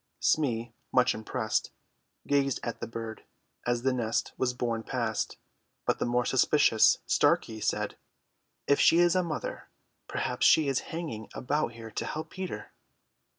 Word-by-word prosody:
Smee, 120 -6 +1 0.2
much 125 0 +4
impressed, 110 0 -2 0.6
gazed 140 -2 +1
at 115 - -4
the - - -3
bird 115 -1 -6 0.4
as 120 0 0
the 130 0 +2
nest 115 -2 -1
was 130 -1 0
borne 115 -2 -1
past, 115 -3 -2 0.5
but - - +1
the - - 0
more 120 0 +1
suspicious 130 -4 +4
Starkey 110 -1 +2
said, - - -1 0.7
"If 140 - +3
she 165 - +6
is 175 +1 +4
a 185 - +4
mother, 165 -4 -5 0.4
perhaps - - +1
she 155 -2 +5
is 135 -2 +1
hanging 155 -11 -5
about 140 -1 -1
here 115 -1 -9
to - - -3
help 155 +1 -5
Peter." 185 -1 -6
125 Hz, 150 wpm, -29 LUFS, 115-145 Hz, 0.7 s, she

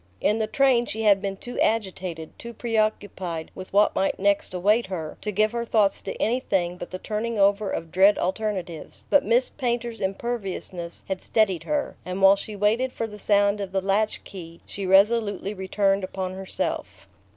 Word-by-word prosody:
In 210 +2 +1
the 220 - 0
train 255 -2 +3
she 220 +1 -3
had 200 -2 +5
been 195 -1 -3
too 245 +5 -7
agitated, 185 -7 -1
too 235 0 -8
preoccupied 205 -7 -2
with 185 - -9
what 205 +2 +4
might 195 - 0
next 200 +1 +1
await 205 +5 +2
her, 165 -5 -5
to 210 - -3
give 215 +2 +2
her 235 0 -2
thoughts 215 -4 +2
to - - -6
anything 195 -7 0
but - - -7
the 185 - -5
turning 220 +3 -3
over 200 0 +3
of 165 -1 -4
dread 195 +3 +5
alternatives; 185 -4 -3
but 290 - +5
Miss 235 +4 +3
Painter's 240 -3 -3
imperviousness 190 -4 -4
had 190 -1 -3
steadied 195 -6 +1
her, 295 -1 -2
and 185 +1 -4
while 195 0 +7
she 210 +1 -7
waited 220 +6 +1
for 230 - -3
the 210 -1 -9
sound 205 0 +2
of 195 -2 -5
the 195 - +1
latch 200 +3 0
key 170 -3 -10
she 195 -2 -5
resolutely 205 +1 +3
returned 195 0 0
upon 185 0 -4
herself. 190 0 -4
200 Hz, 180 wpm, -25 LUFS, 190-220 Hz, -, while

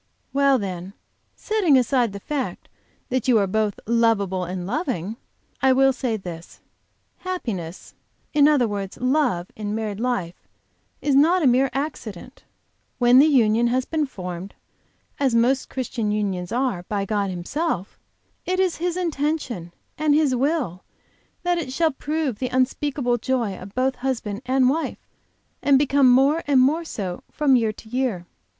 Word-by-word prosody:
"Well, 275 -1 +4
then, 190 -3 -5 0.4
setting 395 -10 +2
aside 250 -2 +2
the 200 - -7
fact 280 +5 -4 0.4
that 255 -1 -1
you 245 -3 +5
are 200 - +3
both 210 +1 -1
lovable 210 -5 +1
and 180 0 -5
loving, 220 - -2 0.5
I 265 0 +5
will 270 +1 +4
say 250 -4 -2
this: 175 -4 -9 0.6
Happiness, 210 - -5 0.4
in 295 -1 +6
other 285 -6 +3
words 200 -2 -5
love, 255 - +1
in 210 -1 -4
married 215 -2 -3
life 230 -8 -3 0.6
is 290 - +2
not 325 +6 +4
a - - +3
mere 260 +1 +4
accident. 260 - -6 0.5
When 245 0 +6
the 295 - +7
union 235 -5 +3
has 255 +2 0
been 310 -2 -1
formed, 180 -4 -7 0.6
as 265 -4 +2
most 255 +3 +2
Christian 235 -4 -2
unions 195 -4 -2
are, 245 -6 0
by 200 -2 -1
God 205 -1 -1
Himself, 185 - -3 0.4
it 370 +1 -1
is 375 -2 +1
His 350 +1 -2
intention 290 - -2 0.3
and 305 -1 +3
His 300 -4 +3
will 260 - -1 0.6
that 350 -1 +1
it 270 -6 -4
shall 320 +3 +2
prove 290 -4 -2
the 255 - -1
unspeakable 255 -1 0
joy 235 -5 -1
of 190 +2 -11
both 260 +1 +1
husband 235 -5 -3
and 260 0 +3
wife, 315 +5 -2 0.5
and 280 -1 +5
become 275 -1 +4
more 275 +6 +4
and 280 -3 +4
more 295 +6 +3
so 190 - -5
from 285 -3 +3
year 225 -3 +2
to 220 - -14
year. 240 -7 -2
250 Hz, 155 wpm, -23 LUFS, 205-280 Hz, 0.6 s, the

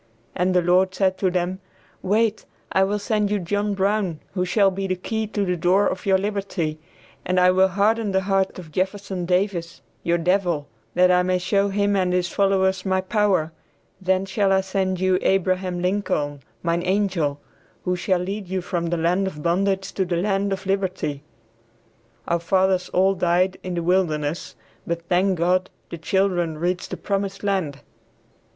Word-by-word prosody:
and 180 +1 0
the 180 - +4
Lord 185 +2 +3
said 190 -1 +1
to 190 - +2
them, 180 +1 -1 0.4
"Wait, 215 +2 +1 0.3
I 190 - +3
will 200 +2 0
send 210 0 0
you 210 - +1
John 205 +3 -1
Brown 195 -4 0
who 180 -2 0
shall 195 +2 +3
be 195 +1 -3
the 185 - 0
key 220 +4 -3
to 205 -1 -1
the 180 -1 0
door 180 +4 +3
of 185 - -2
your 190 -1 +5
liberty, 195 -6 -2 0.4
and 185 0 +1
I 180 0 +6
will 190 +1 +4
harden 205 +3 +1
the 190 0 +2
heart 195 0 0
of 170 -4 -10
Jefferson 190 0 -2
Davis, 180 -2 -1 0.2
your 170 0 +1
devil, 175 -4 0 0.3
that 180 +1 +5
I 180 0 +4
may 185 0 +1
show 200 +2 +1
him 200 +1 +1
and 185 -2 +1
his 180 -1 +1
followers 190 -1 +1
my 190 -1 +1
power; 185 -4 +1 0.5
then 190 +1 +1
shall 195 0 +1
I 190 0 +4
send 190 -1 -1
you 185 0 +2
Abraham 185 -1 0
Lincoln, 180 -7 -1 0.2
mine 170 0 +1
angel, 185 -7 0 0.4
who 180 - 0
shall 180 0 0
lead 195 +2 -4
you 190 0 -2
from 175 -1 -2
the 170 +1 -1
land 180 +4 +1
of 150 -5 -7
bondage 190 +3 0
to 190 - 0
the 175 -2 -1
land 195 +2 0
of 195 0 -3
liberty." 185 -7 -1 1.1
Our 170 - +1
fathers 185 +1 +1
all 190 +2 +3
died 180 +1 +1
in 180 -1 -4
"the 170 - -2
wilderness," 165 -5 0 0.3
but 170 0 -2
thank 185 +1 +2
God, 180 +2 +1 0.2
the 170 - -6
children 175 -2 0
reached 180 +3 -2
"the - - -5
promised 195 0 -3
land." 185 -9 -1
185 Hz, 175 wpm, -23 LUFS, 175-195 Hz, 1.1 s, I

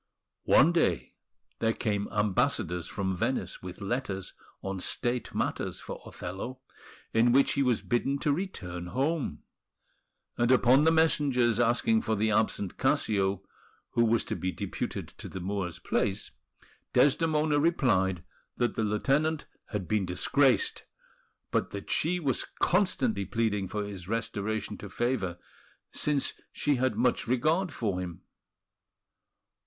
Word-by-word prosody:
One 155 +6 +6
day 170 -1 +1 0.5
there 115 0 +2
came 105 -2 -1
ambassadors 105 - 0
from 95 -1 -2
Venice - - -2
with 90 +2 -8
letters 100 -3 -3 0.3
on 95 0 -3
State 120 +6 -1
matters - - -2
for - - -7
Othello, 95 +9 -6 0.5
in 115 +2 +4
which 135 +2 +5
he 140 - +1
was 125 -4 +2
bidden 135 +3 0
to 145 - +2
return 90 - -4
home; 140 - -1 1.0
and 120 +1 +3
upon 130 +3 +5
the 160 - +6
messengers 140 -8 +3
asking 120 - +3
for 110 - 0
the 110 +1 +1
absent 105 -3 0
Cassio, 100 -2 +1 0.5
who 120 - +3
was 115 0 +2
to - - -3
be 95 - -2
deputed - - -4
to - - -6
the 95 - -6
Moor's 90 -2 -3
place, 95 +2 -1 0.6
Desdemona 150 0 +3
replied 95 - +2 0.3
that 120 - +1
the 110 - -1
lieutenant 140 +9 +1 0.2
had 100 -5 -4
been 105 -3 +1
disgraced, 130 +9 +2 0.7
but - - +1
that 100 -1 -6
she 180 +3 +2
was 140 -6 0
constantly 135 - +2
pleading 105 0 0
for 105 +2 -3
his 100 -4 -7
restoration 110 -1 -2
to 105 - -8
favour, 110 -6 -1 0.5
since 145 -2 0 0.2
she 145 -2 +1
had 130 -3 +1
much 120 +2 +1
regard 155 +9 +1
for 105 -9 -2
him. 90 -2 -6
115 Hz, 135 wpm, -29 LUFS, 100-140 Hz, 1.0 s, One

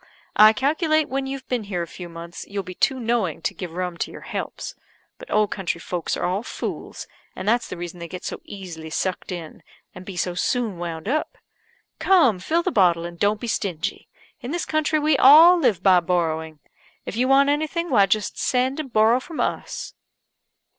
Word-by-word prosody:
I 215 +1 +8
calculate 310 - +1
when 270 0 -2
you've 270 -1 -6
been 245 -4 -2
here 180 -4 -2
a - - -7
few 175 +1 -9
months, 170 +1 -8
you'll 200 0 -4
be 185 +1 -8
too 260 +8 +1
knowing 225 -9 -1
to - - -1
give 175 -2 -7
rum 180 -1 -3
to - - -2
your - - -10
helps. - - -5 0.5
But - - -11
old 210 -1 +2
country 190 -4 -2
folks 170 0 -3
are - - -2
all 185 +3 0
fools, 240 - -6 0.3
and 185 - -6
that's 235 +2 +2
the - - -7
reason 175 0 -7
they 170 - -6
get 180 +2 -8
so - - -5
easily 175 -5 -8
sucked 185 +4 -3
in, 170 -3 -7 0.3
and 180 - -10
be 185 -1 -8
so 180 0 -1
soon 220 0 -1
wound 170 0 -5
up. 300 +6 -1 0.6
Cum, 290 - +4
fill 330 - 0
the 370 - 0
bottle, 175 - +3
and 170 0 -8
don't 205 +2 +2
be - - -5
stingy. 185 -8 -3 0.3
In 245 - -7
this 345 +3 -2
country 310 0 +1
we 300 -1 +2
all 325 +7 +9
live 225 - +1
by 185 -2 +6
borrowing. 160 -3 -2 0.4
If - - -5
you 250 +3 +1
want 275 +1 +5
anything, 315 +3 -1
why 200 -5 +5
just 215 0 -1
send 260 +3 +1
and 280 -5 -5
borrow 225 +3 +4
from 315 +4 -9
us." - - -3
205 Hz, 200 wpm, -23 LUFS, 175-270 Hz, 0.6 s, all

